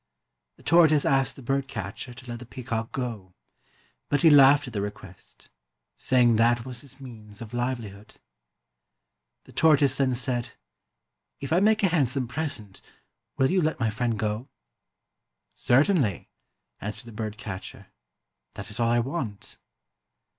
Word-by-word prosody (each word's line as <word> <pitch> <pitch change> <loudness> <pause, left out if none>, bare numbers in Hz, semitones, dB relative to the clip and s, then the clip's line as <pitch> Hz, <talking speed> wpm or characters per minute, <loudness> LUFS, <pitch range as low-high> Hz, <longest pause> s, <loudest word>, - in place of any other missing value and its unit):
The - - -21
tortoise 155 -3 +5
asked 135 -1 +2
the 135 - -12
bird 135 +2 -1
catcher 125 -1 -6
to 125 +1 -13
let 120 -1 -6
the 125 - -10
peacock 115 -3 -4
go; 110 -8 -5 0.7
but 145 +3 +1
he 165 - +8
laughed 140 0 +7
at 125 - -9
the 100 - -1
request, 95 -2 -10 0.4
say 130 -1 +2
ing 120 -2 +4
that 115 +1 +3
was 125 -2 -7
his 135 -1 -12
means 110 -6 -11
of 115 0 -9
livelihood. 120 -5 -4 1.3
The - - -17
tortoise 145 -4 +4
then 130 -2 +1
said, 120 -1 -2 0.9
"If 140 +2 -3
I 175 - +5
make 215 +2 +3
you - - +6
a - - -2
handsome 135 -5 +1
present, 125 -8 -5 0.6
will 130 +1 +3
you 185 - +3
let 155 -1 -1
my 115 -3 +1
friend 115 +1 -1
go? 110 +5 -3 0.4
" - - -58
" - - -59 0.2
Certainly," 135 - +2 0.5
answered 105 +3 -6
the 115 - -10
bird 110 -1 -4
catcher, 95 -3 -8 0.3
" - - -57
that 100 +2 -8
is 105 - -6
all 115 -1 +2
I 120 - +3
want." 120 -4 -4
125 Hz, 160 wpm, -26 LUFS, 110-140 Hz, 1.3 s, he